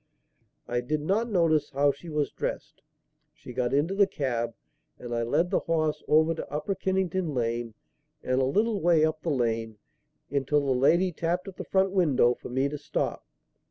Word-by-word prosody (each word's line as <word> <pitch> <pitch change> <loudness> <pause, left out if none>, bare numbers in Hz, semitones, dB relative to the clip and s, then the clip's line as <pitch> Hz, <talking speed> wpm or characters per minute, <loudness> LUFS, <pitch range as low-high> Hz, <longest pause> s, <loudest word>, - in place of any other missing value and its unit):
I 120 0 -1
did 150 +5 -2
not 205 +9 0
notice 165 -7 +2
how 140 +1 +2
she 165 +5 -11
was 150 -2 -1
dressed. - - -5 0.5
She 125 - -11
got 125 0 -1
into 145 +7 +1
the 200 0 +4
cab 120 - -2 0.4
and 120 -1 -7
I 115 - 0
led 150 +9 +1
the - - +3
horse 155 -2 -1
over 160 +2 +4
to 160 - -7
Upper 150 +6 -2
Kennington 185 -4 -1
Lane 115 -1 -2 0.5
and 130 +1 +1
a - - +2
little 210 - +1
way 165 -2 +4
up 155 0 -2
the 165 - -2
lane, 115 -5 -1 0.5
until 140 +1 +1
the 135 - +1
lady 170 +8 +3
tapped 170 +3 -2
at 190 - -9
the - - -5
front 190 0 +1
window 150 -10 +3
for - - -10
me 130 +3 +1
to 145 +1 -5
stop. 145 - -3
150 Hz, 185 wpm, -27 LUFS, 130-175 Hz, 0.5 s, the